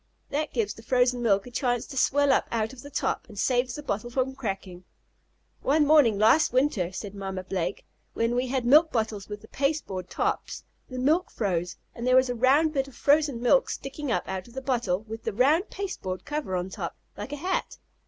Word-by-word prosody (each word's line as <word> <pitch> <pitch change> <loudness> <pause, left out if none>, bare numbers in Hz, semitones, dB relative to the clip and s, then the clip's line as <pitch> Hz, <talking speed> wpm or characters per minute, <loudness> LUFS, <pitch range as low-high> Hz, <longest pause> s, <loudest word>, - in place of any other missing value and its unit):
That 300 +2 -1
gives 215 -4 -1
the 225 - -13
frozen 245 +1 +2
milk 200 -4 +2
a 245 - -10
chance 245 -1 0
to 280 - -10
swell 285 +2 +3
up - - +2
out 225 +1 -1
of 255 - -11
the 285 - -10
top, - - -2
and 210 - -12
saves 245 +3 +1
the 295 - -7
bottle 215 -2 -3
from 260 +2 -1
cracking." 195 -7 -5 0.8
"One 295 +2 +3
morning 285 -8 +5
last 225 +10 +4
winter," 250 -9 +1
said 195 +1 -6
Mamma 190 -2 -5
Blake, 185 0 -3 0.3
"when 230 +1 +1
we 250 +1 0
had 255 -1 -1
milk 305 +6 +6
bottles 220 -4 -2
with 210 0 -6
the 220 - -14
pasteboard 275 - -2
tops, - - -2 0.3
the 255 - -6
milk 310 +8 +2
froze 180 -5 -2 0.2
and 235 +1 -5
there 255 - +5
was 260 0 +5
a - - -1
round 275 +6 +3
bit 270 -2 0
of 275 - -14
frozen 285 -4 +2
milk 265 +2 +4
sticking 275 0 -4
up - - -1
out 190 +1 -4
of 240 - -17
the 265 - -4
bottle, 235 -8 0
with 225 0 -8
the 225 - -2
round 295 - +3
pasteboard 280 - -5
cover 295 -10 -3
on 180 +1 -3
top, - - -5 0.2
like - - -7
a - - -2
hat." 360 +6 -2
245 Hz, 210 wpm, -27 LUFS, 205-280 Hz, 0.8 s, milk